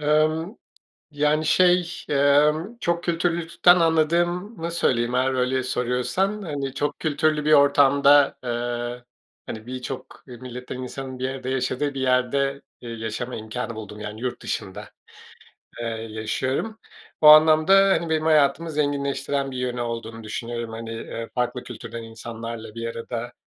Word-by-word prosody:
Emm, 155 +6 +1 0.6
yani, 150 +1 +1
şey, 180 +1 +2
emm, 150 +8 +3
çok 170 -2 0
kültürlülükten 170 +1 +3
anladığımı 170 +3 +1
söyleyeyim. 120 -7 +1
Eğer 130 +1 +2
öyle 130 0 0
soruyorsan, 130 - -1
hani, 140 -7 -4
çok 145 +1 -2
kültürlü 155 -1 0
bir 155 - +4
ortamda, 140 0 +5
eee, 120 0 -3 0.4
hani, 110 +1 -8
birçok 130 +1 -7
milletten 125 0 -8
insanın 130 0 -6
bir 130 - -1
arada 130 -1 -5
yaşadığı 130 +2 -1
bir 135 - -4
yerde, 135 +2 +1 0.2
eee, 120 - -8
yaşama 115 +2 -5
imkânı 115 +2 -5
buldum. 105 -1 -8
Yani 105 +1 -7
yurt 125 -1 -3
dışında, - - -5 0.9
eee, 120 - -3 0.2
yaşıyorum. 130 - -2 0.4
O 155 - +4
anlamda, 155 +3 +7 0.2
hani, 170 -2 +1
benim 155 -1 +1
hayatımı 155 +1 +3
zenginleştiren 140 -2 -1
bir 130 - -7
yönü 125 -1 -2
olduğunu 115 -1 -5
düşünüyorum. 115 +1 -5
Hani, 115 0 -7
eee, 115 0 -6
farklı 125 0 -1
kültürden 115 -1 -8
insanlarla 115 0 -8
bir 115 0 -4
arada, 120 +1 -5
135 Hz, 135 wpm, -24 LUFS, 120-155 Hz, 0.9 s, anlamda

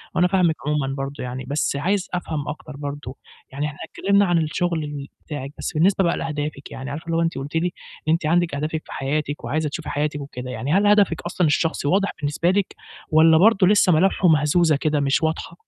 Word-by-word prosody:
وأنا 180 - +4
فاهمِك 180 -4 +2
عمومًا 140 -2 0
برضه 135 0 -5
يعني، 125 +1 -5
بس 145 +1 0
عايز 185 +7 0
أفهم 160 -5 -3
أكتر 150 -1 -7
برضه، 140 -2 -6 0.3
يعني 140 +2 -3
إحنا 150 -1 -5
اتكلِّمنا 200 +1 +2
عن 175 -2 +2
الشُغل 165 +1 -1
ال 145 -2 -6 0.2
بتاعِك، 140 -2 -6
بس - - -4
بالنسبة 190 +5 +3
بقى 170 - +1
لأهدافِك، 150 -2 -4
يعني 135 +1 -6
عارفة 150 +4 -6
اللي 165 0 -1
هو - - +2
أنتِ 165 -4 -1
قُلتِ 140 +3 -6
لي 165 +2 +1 0.4
إن - - +3
أنتِ 165 -1 -1
عندِك 170 0 +2
أهدافِك 155 +2 -2
في - - -13
حياتِك 145 +2 -2
وعايزة 150 +6 -1
تشوفي 155 +2 -6
حياتِك 145 0 -2
وكده، 125 -2 -7
يعني 130 +6 -2
هل 205 +2 +4
هدفِك 205 -5 +3
أصلًا 175 0 0
الشخصي 150 -1 0
واضح 195 +4 +2
بالنسبة 150 +4 0
لِك 200 0 -1 0.3
والّا 160 0 +6
برضه 195 0 +5
لسّه 200 -2 +5
ملامحه 180 +3 +3
مهزوزة 155 +1 +4
كده 150 +1 0
مش 140 +3 +1
واضحة؟ 160 +1 -2
155 Hz, 205 wpm, -22 LUFS, 145-175 Hz, 0.4 s, والّا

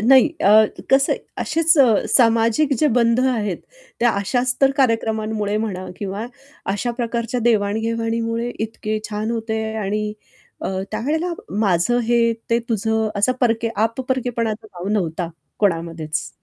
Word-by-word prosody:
नाही. 260 +6 +6
अ, 215 +2 +7 0.3
कसं 270 +1 +4
आहे, - - -2 0.2
असेच 325 +1 +2
अ, 275 - +8 0.2
सामाजिक 230 +4 +3
जे 305 - +3
बंध 235 +1 +3
आहेत, 220 -8 0 0.4
त्या 240 0 +4
अशाच 245 +5 0
तर 270 -1 +5
कार्यक्रमांमुळे 220 -4 0
म्हणा 200 -4 -3
किंवा 205 +3 -4 0.5
अशा 225 +4 -2
प्रकारच्या 235 0 -2
देवाण-घेवाणीमुळे 230 +1 0
इतके 215 0 -3
छान 215 +1 -2
होते 225 -1 -2
आणि 210 0 -2 0.5
अ, - - -1 0.2
त्यावेळेला 305 +11 -1 0.3
माझं 200 +4 +2
हे, 235 -1 +3 0.2
ते 230 - +4
तुझं, 220 0 0
असा 230 +5 +3
परके 230 -2 +2
आप-परकेपणाचा 230 -1 -1
भाव 180 +3 -4
नव्हता 175 -5 -1 0.3
कोणामध्येच. 165 -5 -1
225 Hz, 130 wpm, -21 LUFS, 210-240 Hz, 0.5 s, अ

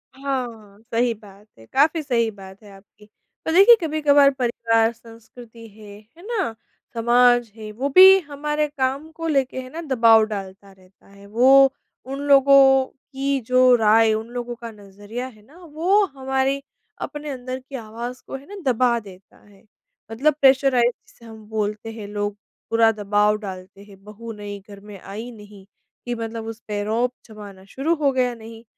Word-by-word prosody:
हाँ, 240 -7 -5
सही 235 +1 +1
बात 205 -1 -17
है, 110 - -16
काफ़ी 315 - +1
सही 235 -5 0
बात 195 0 -14
है 205 - -14
आपकी। 195 +2 -19 0.4
तो - - -1
देखिए, 395 +7 +8
कभी-कभार 295 -3 +3
परिवार, 230 -2 +1
संस्कृति 230 0 -15
है, 205 -1 -14 0.2
है 345 - -15
ना? 395 - -2 0.4
समाज 240 0 +3
है, 215 -1 -9
वो 255 +6 -3
भी 380 +1 +9
हमारे 300 -1 -3
काम 275 +1 -3
को 330 +1 -6
लेके 275 -4 0
है 255 - -11
ना 325 +5 -7
दबाव 225 -2 +5
डालता 195 -2 -8
रहता 190 0 -24
है। 200 0 -17
वो, 265 +5 +5 0.3
उन 270 +1 -6
लोगों 270 -1 +6
की 275 0 -4
जो 255 0 +5
राय, 220 0 +4
उन 220 +1 -4
लोगों 245 -1 -5
का 235 -1 -9
नज़रिया 205 +4 -9
है 215 -5 -16
ना, 295 +8 -20
वो 345 +6 +1
हमारी 265 -2 -2 0.4
अपने 295 0 -6
अंदर 255 -1 -6
की 265 +1 -12
आवाज़ 235 +2 -7
को - - -6
है 270 +1 -10
ना 405 - -10 0.2
दबा 240 0 +1
देता 195 -2 -16
है। 200 -1 -22 0.5
मतलब 280 +7 +1
प्रेशराइज 265 -3 +4 0.2
जिसे 235 - -20
हम 220 -1 -13
बोलते 215 0 -3
हैं, 220 -2 -9
लोग 205 0 -4 0.3
पूरा 225 0 +4
दबाव 210 0 +1
डालते 195 -1 -10
हैं, 195 -1 -18
बहू 215 +3 -10
नई 205 -1 -8
घर 200 -1 -11
में 205 -1 -12
आई 210 +6 -8
नहीं, 205 -3 -15 0.4
कि 245 0 -3
मतलब 225 -1 -6
उस 225 0 -7
पे 205 -1 -3
रोब 230 +4 -1
जमाना 205 -4 -12
शुरू 280 +11 -2
हो 295 -3 +1
गया 250 -2 0
नहीं, 225 0 -12
230 Hz, 170 wpm, -22 LUFS, 210-270 Hz, 0.5 s, भी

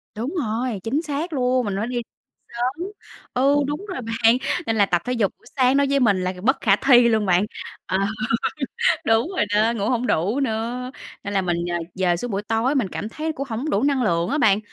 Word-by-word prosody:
Đúng 240 +9 -3
rồi, 235 - -2
chính 270 +7 0
xác 315 +2 -3
luôn, 255 -2 +1
mình 200 -2 -2
phải 215 +3 -1
đi 245 -1 -2 0.6
sớm. 260 +8 -2 0.5
Ừ, 270 +3 +3
đúng 295 +8 -4
rồi 370 -9 -5
bạn, 225 +1 +3 0.3
nên 225 - +1
là 205 -2 +4
tập 175 -3 +1
thể 250 - -1
dục 220 -5 +1
buổi - - -28
sáng 260 +1 +4
nói 280 0 +3
với 280 0 +2
mình 210 -7 +3
là 185 +1 -1
bất 265 +4 +3
khả 195 -3 +4
thi 245 +1 +5
luôn 220 -2 +2
bạn. 180 +1 +3 0.4
Ờ, 185 - 0 1.1
đúng 225 +5 +3
rồi - - +3
đó, 220 +2 +3
ngủ 205 -1 -1
hổng 250 0 0
đủ 205 - +1
nữa, 245 +1 -2 0.3
nên 200 - -4
là 195 - +2
mình, 175 -2 0
ờ, 175 - 0 0.2
dời 180 -2 +1
xuống 245 +8 -5
buổi 200 0 -2
tối 225 +6 0
mình 250 -9 +1
cảm 210 - -5
thấy 310 +7 -3
cũng 275 -2 -5
hổng 245 +8 -2
đủ 200 - +1
năng 275 -2 +2
lượng 170 -5 +1
á 300 - 0
bạn, 205 -7 +4
235 Hz, 225 wpm, -22 LUFS, 205-265 Hz, 1.1 s, thi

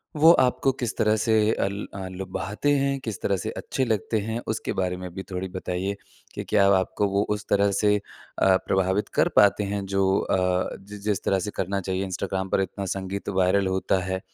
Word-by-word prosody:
वो 160 +3 +7
आपको 130 -2 +3
किस 120 -3 -4
तरह 110 -1 +3
से 110 0 +2
अ, - - 0
ल 100 -1 -6
लुभाते 105 +8 -2
हैं 135 0 0
किस 110 -6 -6
तरह 100 -1 +1
से - - -4
अच्छे 130 - -2
लगते 110 0 0
हैं? 110 +3 -3
उसके 110 - -2
बारे 90 -1 -1
में 90 0 -6
भी 95 0 -6
थोड़ी 90 +1 -3
बताइए 95 +1 -3 0.4
कि - - -4
क्या 100 -2 +3
अब 100 - +5
आपको 95 +2 +1
वो 100 +1 +1
उस 105 - -9
तरह 100 0 +3
से 105 +1 +3
अ, 95 -1 0
प्रभावित 95 +2 +1
कर - - +5
पाते 105 0 +5
हैं? 100 0 -3
जो 95 0 +2
अ, 90 -1 0
जि 105 0 -9
जिस 100 -1 -2
तरह 95 - +2
से 100 +3 -4
करना 100 +1 -1
चाहिए, 95 +1 -2
इंस्टाग्राम 95 0 -3
पर 95 - +2
इतना 95 +1 -4
संगीत 95 +1 -4
वायरल 95 0 +2
होता 95 0 +1
है। 95 0 -2
100 Hz, 205 wpm, -25 LUFS, 95-105 Hz, 0.4 s, वो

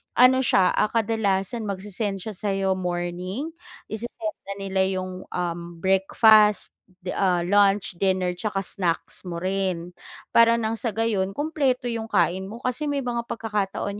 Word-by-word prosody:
ano 255 +1 +6
siya, 185 - +4
ah, 215 - +4
kadalasan 220 -1 0
mag-se-send 200 0 -3
siya 220 - -5
sayo 195 -2 0
morning, 180 - -3 0.4
i-sesend 220 -1 -4
na 200 - -3
nila 190 -1 0
yung, 185 0 -5
um, 175 -1 -4
breakfast, 210 +2 +5 0.3
de 180 - -3
ah 180 -3 +1
lunch, 195 -1 +2
dinner 185 -2 +1
'tsaka 195 +2 -2
snacks 180 0 -2
mo 170 -1 -5
rin, 185 -2 -1 0.4
para 230 0 +6
nang 225 -1 -1
sa 225 -4 -1
gayon 205 -4 0
kumpleto 275 -5 0
yung 225 -1 -4
kain 185 -1 +1
mo, 230 +4 -9
kasi 255 +4 -1
may 285 -1 -1
mga 235 -1 -3
pagkakataon 205 -2 -3
200 Hz, 145 wpm, -24 LUFS, 185-225 Hz, 0.4 s, ano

